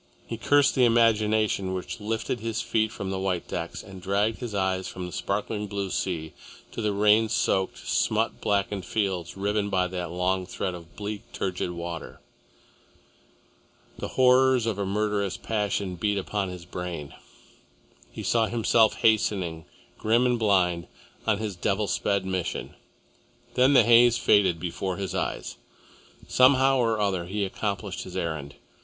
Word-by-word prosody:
He 115 - -5
cursed 140 +4 +3
the 130 - +3
imagination 110 -4 +3
which 95 +5 -5
lifted 110 +3 -2
his 115 0 -3
feet 110 -1 0
from 95 -3 -5
the 95 - -2
white 95 -2 -2
decks - - -5
and 95 -1 -11
dragged 100 +4 0
his 120 -5 -5
eyes 95 -1 0
from 90 -1 -6
the 90 - -7
sparkling 105 +2 -2
blue 100 -1 -3
sea 80 -4 -2 0.4
to - - -5
the 105 -1 +1
rain 105 +2 +4
soaked, 95 -2 0
smut - - 0
blackened 100 -1 0
fields 95 -3 -2
riven 100 +1 0
by 95 -2 +2
that 90 -2 -4
long 90 +1 -1
thread 95 -1 -3
of 85 -1 -11
bleak, 105 0 -5
turgid 90 -1 -2
water. 85 -1 -6 1.8
The - - -3
horrors 130 -1 +5
of 110 -3 -2
a 100 - -1
murderous 105 -1 -1
passion 100 -4 -2
beat 105 +2 0
upon 100 0 -2
his 90 -1 -8
brain. 90 -5 -6 1.0
He - - -7
saw 115 -1 +2
himself 115 -1 +3
hastening, 95 -7 +1 0.3
grim 115 +3 +3
and 125 -1 +2
blind, 90 -5 +2 0.4
on 110 -2 +3
his 105 -2 -4
devil 100 +4 0
sped 100 +1 0
mission. 95 -2 -3 0.8
Then 130 +3 +4
the 135 - +7
haze 120 0 +6
faded 100 -4 +4
from - - -15
before 90 +1 -3
his 95 -2 -4
eyes. - - -3 0.7
Somehow 130 +1 +5
or 115 -3 +1
other 95 -4 0
he 100 +2 -1
accomplished 100 +1 -3
his - - -7
errand. 75 -4 -4
100 Hz, 155 wpm, -26 LUFS, 95-110 Hz, 1.8 s, the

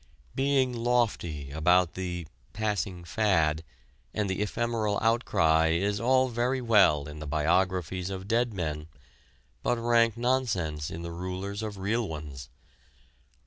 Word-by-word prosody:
Being 135 -2 +2
lofty 115 - 0
about 85 +3 +3
the 90 -2 -4 0.3
"passing 105 -4 -2
fad" 80 -5 +1 0.5
and 105 -1 0
the 95 +1 -2
ephemeral 110 0 -1
outcry 80 -9 +3
is 100 +4 0
all 130 +2 +3
very 120 +2 0
well 100 - +4
in 75 0 -8
the 75 - -6
biographies 90 +4 0
of 95 0 -6
dead 120 +2 +1
men, 80 -5 -4 0.7
but 120 - +1
rank 115 -1 +3
nonsense 100 - 0
in 85 +1 -6
the 85 - -5
rulers 95 +4 -4
of 105 -2 -5
real 110 +4 -1
ones. 75 -4 -7
95 Hz, 130 wpm, -28 LUFS, 80-115 Hz, 0.7 s, well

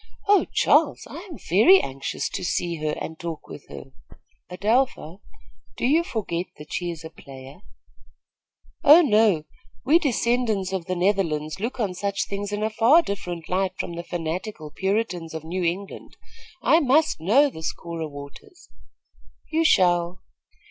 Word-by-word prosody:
Oh, 405 -1 +5
Charles, - - +3
I - - -8
am 320 - -8
very 280 - +5
anxious 135 +1 -4
to - - -5
see 175 -2 -1
her 155 0 -2
and 160 0 -7
talk 165 -3 -6
with 145 - -11
her." 135 - -10 0.6
"Adelpha, 205 - 0 0.6
do - - -1
you 310 +6 +3
forget 185 - -3
that 150 0 -11
she 175 0 -2
is 165 -2 -7
a 160 - -9
player?" 135 -2 -12 1.2
"Oh, 320 +4 +8
no; 210 - +3 0.4
we 310 +6 +5
descendants 235 - 0
of 185 -3 -3
the 185 - -1
Netherlands 175 -4 0
look 230 +5 -4
on 205 -5 -1
such 200 +2 -2
things 200 0 -5
in 210 +1 -2
a 220 - 0
far 245 +10 +5
different 175 - -5
light 185 0 -1
from - - -4
the 170 - -5
fanatical 170 -1 -5
Puritans 190 -4 -2
of 160 - -5
New 180 +3 -3
England. 185 +4 -4 0.5
I 320 - +5
must 295 - +2
know 265 - +4
this 160 -6 -4
Cora 165 -2 -6
Waters." 145 - -12 0.8
"You 325 +1 +2
shall." 175 - +2
185 Hz, 155 wpm, -24 LUFS, 165-225 Hz, 1.2 s, Oh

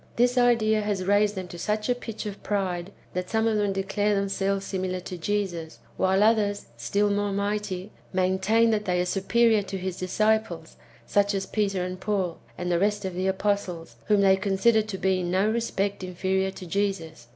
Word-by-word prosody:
This 245 +1 +3
idea 230 -3 +3
has 205 -3 -2
raised 205 +1 +3
them 185 -1 -5
to 175 - -8
such 210 +3 -1
a 250 - +3
pitch 225 -3 -7
of 205 -1 -6
pride, 190 -3 -2 0.2
that 180 0 -3
some 220 0 +1
of 220 -1 +2
them 205 -1 +1
declare 195 +2 0
themselves 195 0 -1
similar 185 -1 -2
to 180 - -7
Jesus; 175 -3 -3 0.2
while 190 +2 +3
others, 210 -2 +2
still 200 - 0
more 205 0 0
mighty, 200 -1 -2 0.2
maintain 190 +5 +2
that 210 -1 0
they 180 -1 +1
are 180 - +1
superior 220 +4 +3
to 195 0 -5
his 185 -1 -4
disciples, 200 -3 0 0.3
such 200 0 +2
as 195 - -1
Peter 200 -4 -1
and 185 0 -5
Paul, 190 -5 -1 0.2
and 180 0 -2
the 170 - +2
rest 205 +1 +1
of 190 - -3
the 185 +2 -1
apostles, 190 -4 -1
whom 210 -2 +3
they 190 -1 +5
consider 200 +3 +3
to 210 -2 -5
be 190 -1 +1
in 175 -1 -2
no 190 +4 +2
respect 205 -4 -1
inferior 190 +1 0
to 190 -1 -9
Jesus. 170 -8 -2
195 Hz, 190 wpm, -26 LUFS, 185-210 Hz, 0.3 s, they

